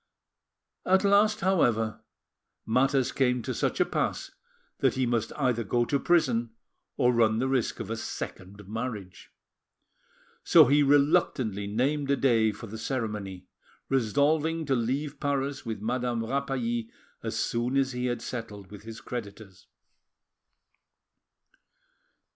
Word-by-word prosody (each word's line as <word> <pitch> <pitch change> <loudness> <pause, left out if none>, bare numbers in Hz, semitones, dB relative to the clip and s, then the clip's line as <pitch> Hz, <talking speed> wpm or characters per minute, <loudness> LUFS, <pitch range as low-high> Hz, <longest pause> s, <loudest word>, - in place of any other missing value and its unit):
At 190 +2 +3
last, 205 +2 +4
however, 120 - +1 0.6
matters 130 +3 +2
came 125 -3 +1
to - - -3
such - - -1
a - - +4
pass - - -2 0.5
that - - +2
he 130 -1 +1
must 120 -2 -1
either 125 -5 0
go 120 +4 +1
to 140 +3 0
prison 120 -10 +1 0.4
or 125 -2 +3
run 110 -2 +3
the 130 +3 0
risk 130 -3 0
of - - -5
a - - -1
second 100 -2 -7
marriage. 110 -4 -6 1.1
So - - +7
he 145 +3 +4
reluctantly 135 -7 +2
named 135 +7 0
a 140 - +3
day 115 -5 +3
for 110 +3 -9
the 110 +1 -8
ceremony, 105 -7 -4 0.4
resolving 150 +6 +1
to 135 -2 +1
leave 140 +5 -2
Paris 140 -2 -2
with 110 -3 -4
Madame 120 0 -1
Rapally 120 -3 -2 0.3
as - - -4
soon 120 +3 0
as 135 -1 +2
he 125 0 -2
had 120 -1 -3
settled 105 -5 -7
with 105 - -10
his 110 +1 -9
creditors. 100 -5 -8
125 Hz, 130 wpm, -28 LUFS, 110-140 Hz, 1.1 s, So